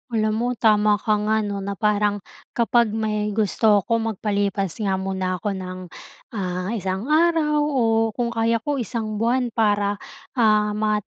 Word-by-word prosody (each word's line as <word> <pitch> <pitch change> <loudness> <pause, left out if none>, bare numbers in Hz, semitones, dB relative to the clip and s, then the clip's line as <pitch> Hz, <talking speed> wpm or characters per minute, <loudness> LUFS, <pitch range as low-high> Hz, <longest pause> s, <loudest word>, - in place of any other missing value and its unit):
Alam 215 -1 +1
mo 240 - 0
tama 210 -2 +3
ka 210 0 0
nga, 215 +1 +1
'no, 200 -1 -3
na 200 0 -4
parang 205 -1 0 0.3
kapag 235 0 +3
may 215 -1 -1
gusto 210 -1 +3
ako 230 +3 0 0.2
magpalipas 200 -2 -1
nga 195 -3 0
muna 190 -1 -2
ako 200 +4 -3
ng, 185 -1 -6 0.5
ah, 185 -2 -3
isang 200 +4 -3
araw 315 -2 +3
o 295 -3 +1 0.3
kung 240 -1 -1
kaya 230 0 +1
ko, 290 -2 -1
isang 220 -3 -3
buwan 240 +2 +1
para, 205 -2 +1 0.4
ah, 215 -2 +3
ma 210 0 0
210 Hz, 155 wpm, -22 LUFS, 200-230 Hz, 0.5 s, tama